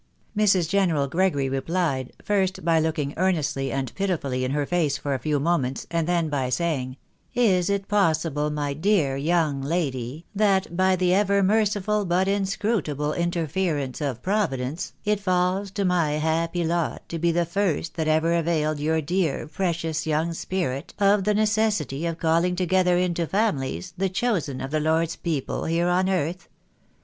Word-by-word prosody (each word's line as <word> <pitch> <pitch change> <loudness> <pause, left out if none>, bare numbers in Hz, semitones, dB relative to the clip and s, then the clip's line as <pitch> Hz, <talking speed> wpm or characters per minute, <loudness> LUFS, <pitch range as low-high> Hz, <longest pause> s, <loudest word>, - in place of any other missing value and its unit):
'' - - -39
Mrs. 195 -5 +3
General 170 -6 +2
Gregory 155 -3 +1
replied, 135 -1 -1
first 190 -4 0
by 165 -1 +4
looking 155 -3 -1
earnestly 155 -7 0
and 135 -3 -3
pitifully 155 -10 -1
in 130 - -1
her 145 +1 0
face 155 -4 0
for 145 -1 -2
a 135 - -1
few 150 +2 0
moments, 140 -4 0
and 165 -1 0
then 170 -2 +1
by 140 -4 -1
saying— 130 -2 -1 0.4
"Is 195 -7 +3
it 200 -1 -1
possible, 160 -7 +1
my 145 -1 -2
dear 160 -4 +1
young 150 -1 +1
lady, 140 -2 -2
that 195 -4 +1
by 185 +1 +3
the 180 0 +2
ever 200 0 +3
merciful 210 0 +1
but 185 +1 +1
inscrutable 195 - -1
interference 170 -5 -1
of 130 -5 -3
Providence, 165 -7 -1
it 210 -1 +1
falls 185 +1 0
to 200 0 -2
my 170 -5 +2
happy 165 +3 0
lot 170 0 -1
to 165 - -4
be 170 +1 +2
the 170 +1 +1
first 170 -2 -1
that 160 -2 -2
ever 160 +2 +2
availed 155 -3 0
your 160 +2 +1
dear 165 -2 -1
precious 160 -2 -2
young 160 +2 0
spirit 165 -6 -3
of 200 -1 +3
the 210 0 +2
necessity 210 - +1
of 165 -1 -3
calling 170 +2 +2
together 180 0 +2
into 175 -2 0
families, 185 -4 -1
the 190 +1 0
chosen 180 - -1
of 135 +1 -5
the 155 - +1
Lord's 160 +2 +1
people 155 -6 -3
here 170 +2 +1
on 185 +1 +2
earth?" 175 -1 -2
170 Hz, 165 wpm, -24 LUFS, 150-190 Hz, 0.4 s, by